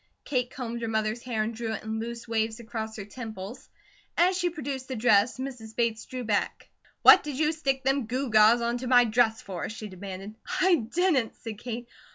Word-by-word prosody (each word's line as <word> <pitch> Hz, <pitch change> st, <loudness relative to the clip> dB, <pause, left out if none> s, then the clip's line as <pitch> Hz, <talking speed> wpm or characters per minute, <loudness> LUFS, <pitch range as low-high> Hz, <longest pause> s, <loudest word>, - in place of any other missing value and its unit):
Kate 250 Hz, -3 st, 0 dB
combed 240 Hz, -4 st, -5 dB
her 230 Hz, -, -2 dB
mother's 220 Hz, +1 st, -1 dB
hair 230 Hz, -4 st, -1 dB
and 225 Hz, +2 st, -3 dB
drew 225 Hz, 0 st, -3 dB
it -, -, -5 dB
in 220 Hz, 0 st, -3 dB
loose 235 Hz, +1 st, -6 dB
waves 225 Hz, 0 st, -1 dB
across 220 Hz, -1 st, -5 dB
her 205 Hz, -, -6 dB
temples. 220 Hz, 0 st, -8 dB, 0.5 s
As 360 Hz, +2 st, +4 dB
she 355 Hz, -1 st, +1 dB
produced 275 Hz, -5 st, -5 dB
the 260 Hz, -, -4 dB
dress, 220 Hz, 0 st, +3 dB
Mrs. 245 Hz, -4 st, -7 dB
Bates 230 Hz, -2 st, 0 dB
drew 255 Hz, -1 st, -5 dB
back. 210 Hz, -3 st, -1 dB, 0.3 s
"What -, -, +10 dB
did 295 Hz, -3 st, -5 dB
you 305 Hz, +1 st, +2 dB
stick 275 Hz, -4 st, -1 dB
them 270 Hz, -3 st, +1 dB
gew 255 Hz, +1 st, -2 dB
gaws 215 Hz, +2 st, +6 dB
onto 240 Hz, +2 st, -1 dB
my 245 Hz, -1 st, +6 dB
dress 225 Hz, 0 st, +2 dB
for?" 185 Hz, -3 st, -5 dB
she 220 Hz, 0 st, -7 dB
demanded. 195 Hz, +2 st, -8 dB, 0.3 s
"I 375 Hz, 0 st, +5 dB, 0.2 s
didn't," 330 Hz, -10 st, +2 dB
said 220 Hz, -3 st, -8 dB
Kate. 240 Hz, 0 st, -5 dB
235 Hz, 200 wpm, -27 LUFS, 220-260 Hz, 0.5 s, What